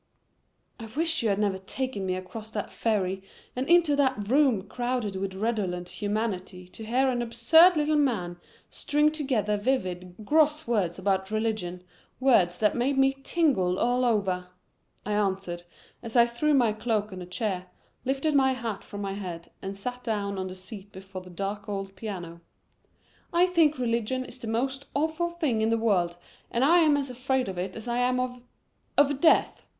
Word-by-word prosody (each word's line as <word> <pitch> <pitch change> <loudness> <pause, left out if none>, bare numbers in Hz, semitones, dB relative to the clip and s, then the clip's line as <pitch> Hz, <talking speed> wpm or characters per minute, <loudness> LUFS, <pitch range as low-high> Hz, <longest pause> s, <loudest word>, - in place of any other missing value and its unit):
"I 225 - -7
wish 325 +1 +1
you 225 - +1
had 200 - +1
never 200 -2 0
taken 205 0 -4
me 185 - 0
across 215 +4 -7
that 210 -2 -4
ferry 195 -4 0 0.3
and 255 +3 -2
into 340 -4 +5
that 260 -7 +1
room 260 -7 +3
crowded 240 -4 -2
with 190 0 -3
redolent 190 -5 -2
humanity 200 -4 -2
to 220 - -10
hear 250 +5 +2
an 245 -2 0
absurd 310 +10 +5
little 305 0 +2
man 195 -11 0 0.3
string 295 +1 +2
together 255 -9 0
vivid, 185 -6 -2
gross 305 +3 +3
words 200 -8 0
about 190 0 0
religion, 215 -5 -2 0.4
words 195 -10 +3
that 210 - +4
made 265 +3 +1
me 270 0 +4
tingle 270 - +1
all 245 +3 +2
over," 195 -6 +1 0.6
I 210 - -3
answered 195 -4 -1 0.4
as 230 -1 -8
I 235 -1 +7
threw 285 +6 +1
my 235 -5 +3
coat 215 -2 -1
on 185 - -7
a 175 - -8
chair, 185 -1 -3 0.4
lifted 275 +4 0
my 265 -2 +4
hat 230 -5 -4
from 205 -1 -8
my 195 -1 -3
head 175 -4 -7
and 195 +1 -5
sat 250 +4 -5
down 200 -4 -2
on 185 - -3
the 185 - -7
seat 195 +2 -9
before 190 -1 -9
the 180 - -13
dark 200 +3 -4
old 195 -1 -4
piano. 180 -5 -7 0.9
"I 345 +1 +4
think 330 -5 +3
religion 245 +1 -1
is 255 - -10
the 235 - -7
most 265 +5 -2
awful 315 +4 0
thing 310 -10 -1
in 220 - +2
the 230 - +2
world 180 -6 +1 0.3
and 240 +3 +1
I 340 +4 +6
am 305 -3 +4
as 275 -2 -3
afraid 260 +1 -1
of 185 -2 -4
it 185 +1 -4
as 225 +1 -7
I 240 0 0
am 250 0 +2
of 250 -1 -3 0.6
of 285 -1 +4
death. 330 - +3
225 Hz, 180 wpm, -27 LUFS, 195-265 Hz, 0.9 s, I